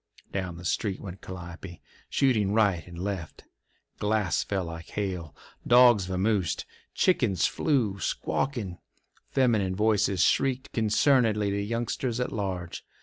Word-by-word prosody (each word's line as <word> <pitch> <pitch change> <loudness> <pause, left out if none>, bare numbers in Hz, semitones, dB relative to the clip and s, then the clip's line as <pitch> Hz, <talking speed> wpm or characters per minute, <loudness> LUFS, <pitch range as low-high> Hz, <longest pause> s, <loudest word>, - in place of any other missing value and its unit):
Down 90 -3 -3
the 90 - -10
street 95 +3 -1
went 95 -1 -8
Calliope, 85 -1 -9 0.3
shooting 110 -7 +2
right 100 -7 +2
and 85 -1 -10
left. 95 -3 -5 0.6
Glass 105 -5 +1
fell 95 -3 -2
like 85 0 -8
hail; 90 -7 -4 0.3
dogs 120 -6 +6
vamosed; 95 -3 0 0.3
chickens 105 - +2
flew, 115 -10 0
squawking; 105 -10 -2 0.5
feminine 110 -8 +2
voices 100 -3 +2
shrieked 130 -1 +1
concernedly 110 -2 +3
to 100 0 -1
youngsters 115 +3 -2
at 125 - -1
large. 95 -5 -4
100 Hz, 120 wpm, -27 LUFS, 90-115 Hz, 0.6 s, dogs